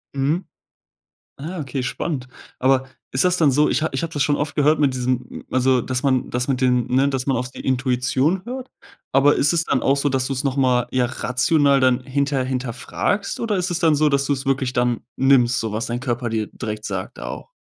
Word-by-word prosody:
Mhm. 145 +7 0 0.9
Ah, 165 +6 -6
okay, 135 -2 -3
spannend. 130 0 -3 0.3
Aber 130 0 +2 0.2
ist 130 - +1
das 180 0 +3
dann 155 -5 +4
so 150 +3 +3
ich - - 0
habe 160 - -2
ich 135 - -1
habe 165 -1 -4
das 145 - 0
schon 145 0 +2
oft 145 0 -3
gehört 150 +2 +3
mit 140 -3 +2
diesem 125 0 -3
also, 130 0 +3
dass 125 +2 -3
man 130 -3 +1
das 125 +2 -2
mit 130 -2 0
den, 125 -2 +2
ne 135 +2 +3
dass 135 -2 -2
man 135 -2 +1
auf 125 +1 -3
die - - -10
Intuition 130 +6 0
hört, 255 +1 -6 0.4
aber 140 +2 +5
ist 140 - +3
es 165 -1 +1
dann - - 0
auch 135 - +3
so, 140 +1 +1
dass 130 -1 0
du's 135 0 -2
noch 135 -1 0
mal, 125 -3 +2
ja, 130 -1 +1
rational 140 +3 +2
dann 130 -1 +3
hinter 140 +1 0
hinterfragst 130 - -2
oder 225 -3 0
ist 180 0 -1
es 175 - -1
dann 165 -3 +3
so, 150 +1 +3
dass 140 -1 +1
du's 140 -1 -1
wirklich 130 -2 0
dann 125 -2 0 0.2
nimmst, 130 -2 +4
so 110 -2 -3
was 110 +4 -2
dein 120 -1 -3
Körper 120 -1 -2
dir 110 -1 -2
direkt 105 -2 -5
sagt - - -5
auch? - - -7
135 Hz, 220 wpm, -21 LUFS, 125-145 Hz, 0.9 s, aber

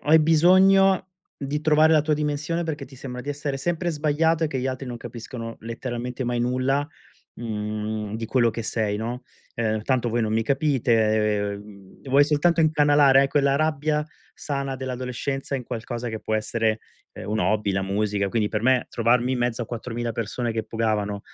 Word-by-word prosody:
hai 160 +2 +6
bisogno 185 +4 +5 0.3
di 140 +2 -3
trovare 155 +1 +5
la 155 - +5
tua 155 0 +1
dimensione 150 +3 -2
perché 150 -3 -4
ti 135 0 -15
sembra 125 -1 -7
di 145 - -4
essere 145 -1 -3
sempre 175 +4 -2
sbagliato 155 +2 +1
e - - +2
che 140 -3 -3
gli 130 - -2
altri 130 +1 -4
non 120 -1 -5
capiscono 115 -1 -7
letteralmente 120 +2 -5
mai 120 0 -1
nulla, 130 +3 0 0.5
mhmm, 105 -1 -4
di 115 0 -4
quello 120 0 +2
che 115 +1 -5
sei, 110 -2 -1
no, 120 +4 -4 0.3
uhm: 110 -2 -1
"Tanto 125 -1 0
voi 120 +1 0
non 110 0 -1
mi 115 0 +2
capite", 110 -7 +1 0.5
vuoi 140 +2 +4
soltanto 160 +3 +2
incanalare 145 -3 +5
quella 140 -1 +2
rabbia 150 0 0 0.3
sana 140 -2 -3
dell'adolescenza 130 +2 -4
in 130 - -3
qualcosa 120 +1 -5
che 110 -1 -4
può 110 - -5
essere, 110 0 0 0.3
ehm, 95 - -9
un 110 +1 0
hobby, 105 -2 +1
la 95 0 0
musica, 100 0 -1
quindi 105 -1 +1
per 105 -1 -2
me 130 0 +3
trovarmi 120 +2 +2
in 125 - -1
mezzo 120 0 -1
a 115 - -6
4000 120 0 -4
persone 115 +2 -3
che 110 0 -2
pogavano, 110 -2 -1
125 Hz, 175 wpm, -24 LUFS, 110-145 Hz, 0.5 s, hai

